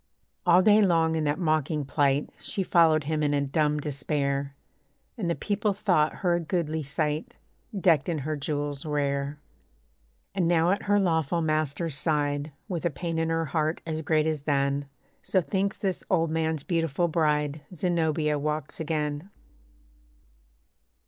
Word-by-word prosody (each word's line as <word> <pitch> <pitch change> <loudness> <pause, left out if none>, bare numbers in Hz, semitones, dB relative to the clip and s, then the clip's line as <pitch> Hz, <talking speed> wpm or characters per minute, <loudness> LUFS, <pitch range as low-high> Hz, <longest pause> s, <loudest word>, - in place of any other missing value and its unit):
All 175 +2 +6
day 215 +1 +6
long 165 -4 +3
in 155 -1 0
that 145 +1 +1
mocking 155 -3 0
plight, 140 0 +1
She 195 - -3
followed 160 -4 +4
him 155 +1 -1
in 145 -1 +2
a 140 - +1
dumb 150 +2 +1
despair; 140 -1 -2 0.6
And 200 -8 -2
the 170 - +1
people 205 0 -1
thought 175 -7 +2
her 175 - +4
a 170 - +2
goodly 160 -2 -1
sight, 150 +2 -2 0.4
Decked 165 -5 +3
in 165 - 0
her 155 0 -1
jewels 145 -1 -3
rare. 140 -1 -1 1.0
And 185 -4 +1
now 170 0 +3
at 200 - 0
her 205 0 +3
lawful 165 -3 +1
master's 155 0 0
side, 145 -1 0 0.2
With 175 -4 -3
a 170 - +2
pain 165 +2 -3
in 165 0 0
her 165 0 0
heart, 155 +2 -1
as 160 -1 -3
great 155 0 +2
as 155 -2 -1
then 140 -1 0 0.4
(So 190 - +1
thinks 195 +2 -1
this 190 -3 -2
old 165 -3 +2
man's 160 -2 -1
beautiful 165 -2 0
bride), 150 -2 0
Zenobia 160 -4 0
walks 150 0 -3
again. 150 +1 -2
155 Hz, 155 wpm, -27 LUFS, 145-170 Hz, 1.0 s, All